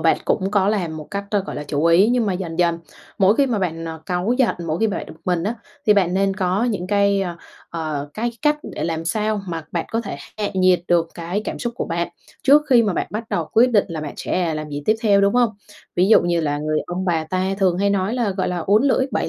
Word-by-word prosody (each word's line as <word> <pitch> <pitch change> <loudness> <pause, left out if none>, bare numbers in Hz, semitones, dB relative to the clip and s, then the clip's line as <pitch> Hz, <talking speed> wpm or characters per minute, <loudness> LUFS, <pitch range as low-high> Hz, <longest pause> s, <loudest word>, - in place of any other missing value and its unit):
bạn - - +3
cũng 190 -1 0
có 200 -1 +2
làm 175 -7 -1
một 155 - -9
cách, 200 0 -3
ơ, 205 -2 +2
gọi - - -5
là, 145 - -4
chủ 145 +2 -1
ý, 175 +6 +5
nhưng 240 -3 +2
mà 195 - +1
dần 180 -2 -5
dần 170 -1 +2 0.4
mỗi 195 +2 +4
khi 280 - +4
mà 230 -5 0
bạn, 165 -3 -2
ờ, 160 -1 -6
cáu 180 +5 0
giận, 255 - +3
mỗi 160 +1 -1
khi 225 - +4
bạn 205 - -3
bực 160 - -13
mình 175 -2 0
á, 220 +4 -1 0.3
thì 210 - +6
bạn 185 -3 +2
nên 195 0 +1
có 190 +3 +1
những 205 -7 -2
cái, 200 0 +2
ơ, 175 -3 -3 0.3
ờ, 155 -3 -3
cái 235 +2 -1
cách 295 0 +3 0.2
để - - -3
làm 165 -1 -2
sao 215 +3 0
mà 165 -2 -4
bạn 170 - -1
có 225 - +1
thể 220 - -6 0.2
hạ 205 - 0
nhiệt 185 -2 +4
được 170 -1 +3
cái 175 +5 -3
cảm - - -4
xúc 240 -1 -3
của - - -2
bạn, 170 +1 -2 0.3
trước 290 +3 +6
khi 240 -2 +7
mà 205 -4 +1
bạn - - -1
bắt 220 +2 -4
đầu 165 -2 -1
quyết 245 +3 +5
định 205 -4 +4
là 160 -2 -4
bạn 150 -2 -6
sẽ 170 -4 -1
làm 155 0 -5
gì 145 0 -5
tiếp 215 - +3
theo, 200 -2 +4
đúng 200 0 +3
không? 245 -2 +4 0.5
Ví 185 +3 +3
dụ 225 - +7
như 170 -1 +1
là 145 -2 -1
người 155 0 -1
ông 180 +2 -3
bà 165 -3 0
ta 185 +3 -1
thường 185 -2 +2
hay 200 0 +2
nói 200 +3 0
là, 235 -5 0
gọi 190 0 -1
là, 180 -1 -2
"uốn 200 +8 +3
lưỡi 265 -1 +3
7 - - 0
185 Hz, 270 wpm, -21 LUFS, 165-210 Hz, 0.5 s, khi